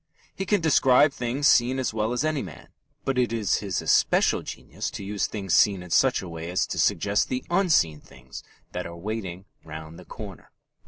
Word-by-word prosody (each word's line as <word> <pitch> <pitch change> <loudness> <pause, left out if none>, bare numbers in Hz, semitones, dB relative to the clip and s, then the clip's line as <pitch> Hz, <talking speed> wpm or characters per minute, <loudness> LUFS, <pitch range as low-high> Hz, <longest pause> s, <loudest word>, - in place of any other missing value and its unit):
He 195 - -5
can 205 -1 +2
describe 145 -2 +4
things 125 +4 0
seen 125 +2 +4
as 130 -4 -1
well 110 +1 -1
as 125 +3 -1
any 155 -3 0
man, - - -10 0.4
but 135 -1 0
it 120 -2 +1
is 110 -4 +1
his 100 -3 -3
especial - - +3
genius - - -6
to - - -7
use 100 +1 -2
things 95 -5 -4
seen 95 -1 +4
in 90 - -12
such 130 -1 +3
a - - -7
way 85 0 -7
as 90 - +1
to - - -5
suggest 100 0 +1
the 130 0 -3
unseen 160 - +2
things 65 0 -12 0.3
that - - -4
are 85 0 -9
waiting 95 -1 -5 0.2
round 80 +1 -9
the - - -13
corner. - - -10
110 Hz, 200 wpm, -25 LUFS, 90-130 Hz, 0.4 s, describe